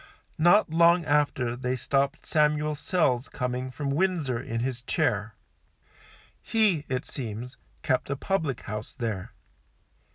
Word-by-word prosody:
Not 175 +2 +5
long 170 +1 +5
after 145 -5 +1
they 125 0 -2
stopped 140 +3 0
Samuel 150 -1 +2
Sells 145 -5 0
coming 125 0 -3
from 140 +2 -3
Windsor, 155 -6 0
in 115 0 -3
his 125 -1 -2
chair. 105 -2 -1 1.1
He, 205 -9 +2
it 130 0 -2
seems, 120 0 -6 0.3
kept 130 -1 0
a 140 - 0
public 155 - -1
house 105 +1 -6
there. 110 -6 -4
135 Hz, 125 wpm, -27 LUFS, 125-155 Hz, 1.1 s, Not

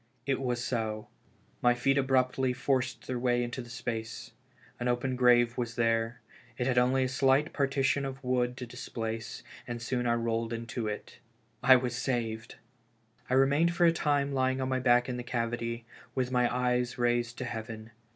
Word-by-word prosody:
It 135 0 0
was 125 -2 -1
so. 110 -3 -2 0.5
My 120 0 +4
feet 135 +3 +2
abruptly 130 -1 +2
forced 130 -1 -1
their 125 -1 -3
way 120 0 +2
into 120 +1 -4
space. 115 -2 -5 0.5
An 125 - -1
open 125 +1 0
grave 120 -1 +4
was 120 -1 -3
there; 115 0 0 0.4
I - - +1
had 125 -1 +3
only 130 +2 +3
a - - +1
slight 135 +3 +2
partition 140 0 +1
of 135 -1 -4
earth 125 -1 +1
to 125 - -6
displace, 115 -2 -5 0.2
and 120 -1 -4
soon 125 +1 -1
I 120 - +3
rolled 115 0 -1
into 115 0 -4
it. 105 - -6 0.4
I 130 - +8
was 125 -1 0
saved! 115 -3 -2 0.7
I 130 - +2
remained 145 +6 +3
for 175 -1 +4
a 165 - +6
time 145 -3 +1
lying 130 -1 +1
on 130 0 -1
my 130 0 +1
back 125 -1 +4
in 125 -1 -3
the 125 - -4
cavity, 115 -1 -2 0.3
with 130 -1 0
my 125 -1 +2
eyes 125 0 0
raised 120 0 0
to 130 - -4
heaven. 110 -1 -6
125 Hz, 175 wpm, -30 LUFS, 120-130 Hz, 0.7 s, I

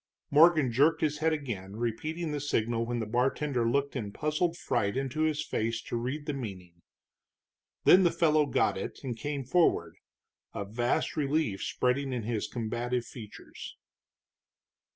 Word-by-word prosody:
Morgan 155 -3 +6
jerked 145 +7 +3
his 150 -1 0
head 160 +1 +2
again, 110 -11 -4
repeating 155 +9 -3
the 150 - -2
signal 115 -4 0
when 120 0 -2
the 115 - -2
bartender 125 +2 0
looked 140 +3 0
in 105 -6 -3
puzzled 155 - -1
fright 115 -6 -1
into 135 +3 -2
his 155 -1 +1
face 115 +1 -1
to - - -5
read 130 +6 -3
the 150 - -2
meaning. 90 -9 -7 1.0
Then 185 - +7
the 175 - +5
fellow 155 -3 +3
got 95 - +1
it, - - -5
and 125 -3 -3
came 145 +2 -4
forward, 125 - +2 0.6
a 100 - -3
vast 120 +4 -1
relief 145 -8 0
spreading 130 +2 0
in 120 -3 -2
his 110 -1 -2
combative 120 +1 -2
features. 110 -4 -10
130 Hz, 150 wpm, -29 LUFS, 115-150 Hz, 1.0 s, Then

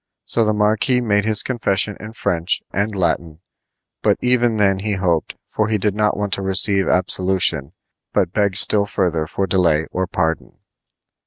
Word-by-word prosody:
So 115 - 0
the 110 - +1
marquis 110 +4 +1
made 105 -4 0
his 110 -1 +1
confession 100 -5 0
in 110 +1 -9
French 90 -6 -1
and 100 +2 -1
Latin, 85 -3 -2 0.6
but - - +2
even 120 -2 +1
then 95 -2 +2
he 105 +1 -2
hoped; 90 -4 -1
for 110 - -1
he 110 0 0
did 105 0 -1
not 105 0 0
wait 105 -1 -3
to 100 - -1
receive 95 0 +3
absolution, 90 -5 +1 0.4
but 90 0 0
begged 100 -3 +1
still 100 -1 +4
further 85 -6 -1
for 95 - -2
delay 85 -5 +1
or 95 0 -2
pardon. 80 -2 -2
100 Hz, 165 wpm, -19 LUFS, 90-105 Hz, 0.6 s, still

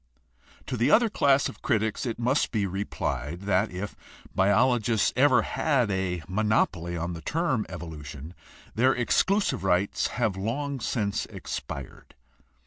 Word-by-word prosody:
To 125 - -3
the 120 +5 +2
other 225 +6 +5
class 140 -5 +3
of - - -10
critics 110 +1 0
it 115 - -3
must 125 +4 +1
be 105 -4 0
replied 90 -4 -3
that 100 +1 +1
if 95 +3 -6 0.4
biologists 110 +2 +3
ever 130 -3 +5
had 130 -9 +1
a 90 -3 -1
monopoly 95 -4 0
on 85 +1 -3
the 85 - -7
term 150 - 0
"evolution" 75 -1 -8 0.4
their 130 +4 +3
exclusive 190 - +1
rights 95 +1 +1
have 115 -6 +1
long 135 +8 -3
since 105 -4 -1
expired. 70 -3 -7
105 Hz, 135 wpm, -27 LUFS, 90-125 Hz, 0.4 s, other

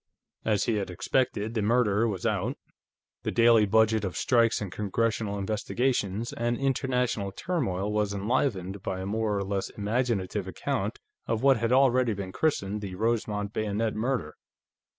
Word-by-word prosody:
As 105 -3 +1
he 115 -2 +1
had 100 -2 -2
expected, 110 +3 -1
the 110 - 0
murder 115 0 +3
was 100 -5 -3
out; - - 0 0.6
the - - -2
daily 115 -2 +5
budget 110 +1 +3
of 95 -3 -3
strikes 115 -3 +3
and 100 -4 -5
Congressional 105 +1 -1
investigations 110 +1 -1
and 120 0 -1
international 125 -6 0
turmoil 105 - -2
was 105 -1 +1
enlivened 100 -2 -1
by 95 -1 -3
a - - -4
more 105 0 0
or 100 - -1
less 100 0 -2
imaginative 105 -2 -1
account - - -2 0.3
of 115 +1 -1
what 135 -2 +6
had 115 +1 0
already 130 -3 +4
been 95 -1 -5
christened 105 -7 0
the 95 -3 -5
"Rosemont 105 -1 -1
Bayonet 110 +1 -1
Murder." 110 - -1
110 Hz, 150 wpm, -28 LUFS, 100-120 Hz, 0.6 s, what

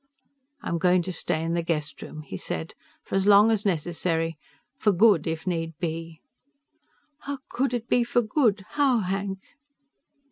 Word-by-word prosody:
"I'm 170 - -2
going 180 0 +3
to 185 - -4
stay 160 -1 -1
in 165 +1 -1
the 170 - +1
guest 155 -3 -3
room," 155 0 -8
he 135 - -8
said, 80 -2 -4 0.3
"for - - -11
as 195 +1 +2
long 210 +2 +7
as 210 -2 +1
necessary. 165 -1 -1 0.4
For 210 - +3
good 195 -4 +4
if 160 +1 -3
need 165 -3 -2
be." 165 -1 -5 1.0
"How 285 -1 -5
could 265 0 0
it 240 -1 -3
be 245 - +3
for 240 +1 +1
good? 215 -4 +1
How, 275 -6 +2
Hank?" 195 0 -3
180 Hz, 165 wpm, -26 LUFS, 165-215 Hz, 1.0 s, long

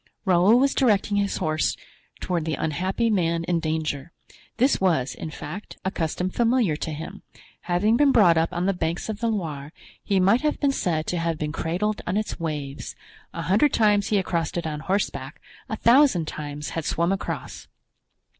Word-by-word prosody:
Raoul 190 +4 +5
was 275 +1 +3
directing 210 -5 +2
his 200 -1 0
horse 155 0 0 0.4
toward 175 -3 -1
the 160 -2 -1
unhappy 185 +11 -1
man 170 -4 +1
in 170 0 0
danger. 155 -1 -3 0.5
This 260 0 +2
was, 160 -9 +1
in - - -6
fact, 155 +6 -8
a 190 - 0
custom 180 +1 -2
familiar 235 -7 +2
to 160 - -4
him. 165 +6 -7 0.5
Having 205 +6 +3
been 290 0 +5
brought 185 -9 +5
up 165 +1 +1
on 175 0 -2
the 195 - +2
banks 170 +2 -3
of 215 -1 -4
the 230 - 0
Loire, 155 -10 -3 0.3
he 195 -2 +1
might 200 +6 +4
have 300 0 0
been 280 -2 +2
said 160 -11 -1
to 175 - -2
have 165 -1 -1
been 150 -1 -3
cradled 185 +8 -2
on 185 +3 0
its 215 -3 -3
waves; 150 -4 -5 0.4
a - - -5
hundred 215 - +3
times 210 -2 +3
he 215 - +1
had 195 -2 +1
crossed 170 -1 -2
it 170 - -2
on 150 -2 -3
horseback, 150 -6 -2 0.3
a 220 - -2
thousand 235 - +4
times 150 -1 -5
had 165 - -3
swum 170 +4 0
across. 195 - -4
180 Hz, 185 wpm, -24 LUFS, 160-210 Hz, 0.5 s, Raoul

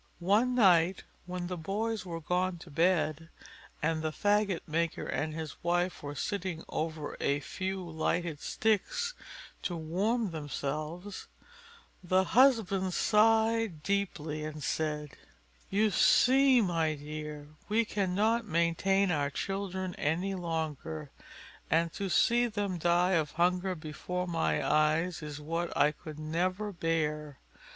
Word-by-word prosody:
One 210 +8 +2
night 185 -5 +4 0.2
when 180 0 -4
the 180 0 -4
boys 210 +4 -2
were 165 -1 -4
gone 180 +3 0
to 165 -1 -13
bed, 165 -1 +1 0.5
and 160 0 +1
the 160 - -1
faggot 205 0 +1
maker 165 +1 -1
and 155 +1 -2
his 160 -3 -6
wife 175 +1 0
were 145 0 -6
sitting 185 0 -3
over 155 -1 -3
a 140 +1 +1
few 190 +4 -4
lighted 165 -1 -1
sticks, 475 - 0 0.5
to 175 - -2
warm 195 +7 0
themselves, 155 +5 -5 0.8
the 185 +1 +3
husband 200 -7 +3
sighed 220 -5 +3
deeply, 160 -6 -1
and 155 -1 -6
said, 150 -2 -2 0.6
"You 210 +2 +2
see, 260 +4 +5
my 165 -4 +1
dear, 150 0 -7 0.2
we 225 +2 +3
cannot 210 +4 +1
maintain 180 +3 +2
our 145 -3 +1
children 190 +3 -3
any 175 +6 0
longer, 160 - -4 0.6
and 165 +2 +2
to 195 -1 -3
see 240 +6 +4
them 205 -5 -2
die 175 +2 +3
of 160 -5 +1
hunger 180 +2 +1
before 160 +3 -4
my 165 -2 0
eyes 155 +4 +2
is 150 -1 -6
what 165 +3 -2
I 150 - +5
could 155 0 -10
never 180 +7 -1
bear. 150 -4 -1
175 Hz, 130 wpm, -31 LUFS, 155-195 Hz, 0.8 s, see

